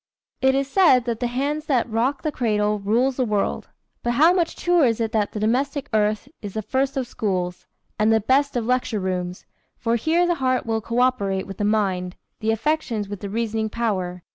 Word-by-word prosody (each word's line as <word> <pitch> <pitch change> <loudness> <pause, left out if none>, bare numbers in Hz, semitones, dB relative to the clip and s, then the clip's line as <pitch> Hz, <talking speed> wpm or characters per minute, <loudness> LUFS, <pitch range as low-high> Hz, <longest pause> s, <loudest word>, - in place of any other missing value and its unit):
It 265 0 +4
is 275 0 0
said 280 -5 +5
that 235 -2 -2
"The 245 - 0
hand 280 +5 -1
that 255 -5 +2
rocks 240 +5 -1
the 310 - 0
cradle 210 -5 0
rules 235 +6 +1
the 260 - +2
world," 210 -4 -1 0.3
but 240 - 0
how 315 +8 +5
much 345 -3 0
truer 350 -4 +3
is 230 -2 +1
it 225 -1 -1
that 215 -2 0
"The 210 - -5
domestic 270 +6 0
hearth 210 0 +1
is 205 -1 -7
the 220 - -2
first 270 +5 -1
of 260 - 0
schools, 185 -6 -3 0.3
and 215 +1 +4
the 220 - +4
best 270 +6 +2
of 235 -2 0
lecture 250 -3 0
rooms; 180 -1 -3 0.3
for 230 0 0
here 325 +8 +2
the 350 - +2
heart 255 -1 +1
will 225 -1 -1
coöperate 230 -5 0
with 195 -1 -9
the 205 - +1
mind, 190 -4 0 0.2
the 220 - -2
affections 230 -3 0
with 205 -2 -5
the 200 - -6
reasoning 220 0 -1
power." 185 -6 -2
230 Hz, 205 wpm, -23 LUFS, 210-265 Hz, 0.3 s, said